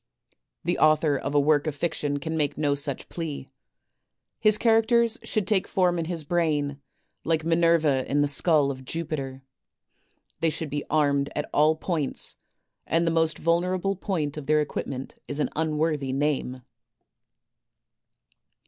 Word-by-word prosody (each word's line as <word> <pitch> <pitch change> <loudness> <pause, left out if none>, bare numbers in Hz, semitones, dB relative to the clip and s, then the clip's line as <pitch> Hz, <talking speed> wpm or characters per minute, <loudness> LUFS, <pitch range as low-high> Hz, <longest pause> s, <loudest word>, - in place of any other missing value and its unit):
The 175 +2 0
author 155 -1 +4
of 140 +1 -3
a - - +6
work 145 +1 +2
of 150 - -2
fiction 145 -2 -2
can 160 +3 -4
make 150 -3 0
no 145 -2 +1
such 140 -1 -2
plea. 155 -5 -5 0.9
His 215 0 +4
characters 230 +1 +3
should 215 -4 -1
take 200 -2 +1
form 180 -2 +1
in 165 - -2
his 165 -1 -2
brain, 145 -3 0 0.4
like 160 -1 0
Minerva 165 -5 +3
in 145 +1 +2
the 145 - +2
skull 145 0 +3
of 130 -1 -8
Jupiter; 135 -3 -4 1.0
they 165 - +2
should 155 -1 -5
be 145 0 -2
armed 140 -2 +2
at 150 - -2
all 155 +2 +4
points, 155 -4 -2 0.5
and 165 +1 +2
the 165 - +2
most 160 -1 +1
vulnerable 180 +3 0
point 160 -7 -3
of 150 - -7
their 155 0 +4
equipment 135 -3 -4
is 145 - -3
an - - 0
unworthy 155 -3 0
name. 135 -3 -1
155 Hz, 150 wpm, -26 LUFS, 145-170 Hz, 1.0 s, a